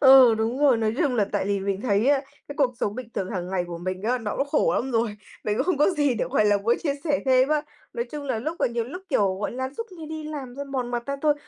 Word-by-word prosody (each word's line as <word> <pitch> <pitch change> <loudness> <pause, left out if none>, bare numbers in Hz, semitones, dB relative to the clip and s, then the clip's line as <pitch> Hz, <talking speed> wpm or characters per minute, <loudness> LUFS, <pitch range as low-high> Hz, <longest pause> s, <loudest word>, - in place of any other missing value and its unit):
Ừ, 265 -4 +8
đúng 225 +3 -1
rồi, 275 -5 +5
nói 220 0 0
chung 285 -7 +2
là 215 - +3
tại 205 -2 0
vì 200 -1 0
mình 195 0 -2
thấy 210 0 +2
á, 280 -1 +4 0.3
cái 285 - -7
cuộc 260 -4 +3
sống 205 - 0
bình 255 -2 -6
thường 185 - -2
hàng 180 -1 -3
ngày 180 -2 0
của 170 -1 -6
mình 185 +2 -4
á, 245 +4 +1
nó 215 -3 -4
cũng 275 - 0
khổ 295 - +2
lắm 265 - -1
rồi. 225 -3 0 0.3
Mình 210 0 0
cũng 265 - +2
không 365 - +2
có 300 - +5
gì 290 -7 +1
để, 220 - -1
gọi 215 - +3
là, 205 -1 +4
muốn 225 +4 +2
chia 285 -4 0
sẻ 295 -3 +2
thêm 260 0 +4
á. 305 -1 +2 0.3
Nói 235 - -2
chung 295 -1 -5
là 255 -5 -1
lúc, 315 +8 -4
à, - - +3
nhiều 235 -1 -2
lúc, 360 +10 -8
kiểu, 195 -2 +2
gọi 210 - -2
là, 260 +1 -3
suốt 460 - -4
ngày 325 -3 -9
đi 315 0 -6
làm 280 -5 -6
thôi 280 - -5
mòn 260 -3 -3
mặt 240 -1 -1
ra 280 0 -2
thôi, 300 -1 +4
250 Hz, 305 wpm, -25 LUFS, 210-285 Hz, 0.3 s, Ừ